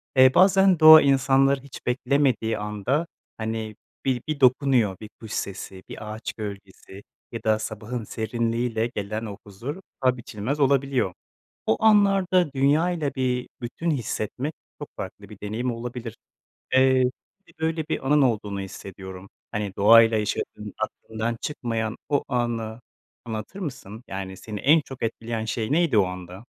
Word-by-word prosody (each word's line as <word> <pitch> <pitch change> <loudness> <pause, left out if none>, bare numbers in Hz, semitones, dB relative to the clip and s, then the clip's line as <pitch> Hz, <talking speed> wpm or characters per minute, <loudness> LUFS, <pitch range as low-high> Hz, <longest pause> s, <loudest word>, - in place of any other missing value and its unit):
Eee, 130 0 +7
bazen 190 -1 +5
doğa 155 0 +11
insanları 135 0 +3
hiç 140 0 -12
beklemediği 125 -2 +1
anda 105 - -1 0.3
hani 110 -1 -4 0.3
bir 130 -3 +1
bir 155 -2 -2
dokunuyor. 130 -6 +3
Bir 110 - -8
kuş 110 -2 -10
sesi, 95 -2 -5
bir 105 0 -7
ağaç 110 +1 -5
gölgesi 100 -2 -9 0.3
ya 115 - -6
da 110 0 +2
sabahın 110 +2 -5
serinliğiyle 115 +1 -1
gelen 105 +2 -3
o 100 -2 -7
huzur, 115 - -6 0.2
paha 130 -1 +3
biçilmez 120 +4 -4
olabiliyor. 135 -7 +2 0.5
O 110 - +3
anlarda 195 -6 +4
dünyayla 145 +2 +1
bir 125 -1 -1
bütün 130 +8 -3
hissetmek 130 +2 -3 0.3
çok - - -6
farklı - - -7
bir - - -13
deneyim 110 +5 -2
olabilir. 120 -1 -6 0.6
Eee, 130 0 +5 0.4
bir - - -20
böyle 160 0 -1
bir 135 - -2
anın 150 +1 +5
olduğunu 105 -6 0
hissediyorum. 95 0 -9 0.2
Hani 105 -3 -3
doğayla 115 +2 +7
yaşadığın 105 -1 -3
aklından 110 +1 -3
çıkmayan 115 -6 -3
o 145 -2 +2
anı 115 -3 -2 0.5
anlatır 110 - -6
mısın? 125 - -7
Yani, 95 -1 -6
seni 105 +1 -7
en 155 +7 +5
çok 135 -4 -9
etkileyen 115 0 -3
şey 110 +1 -2
neydi 160 -6 +3
o 100 - +5
anda? 90 +3 -8
120 Hz, 140 wpm, -25 LUFS, 110-140 Hz, 0.6 s, doğa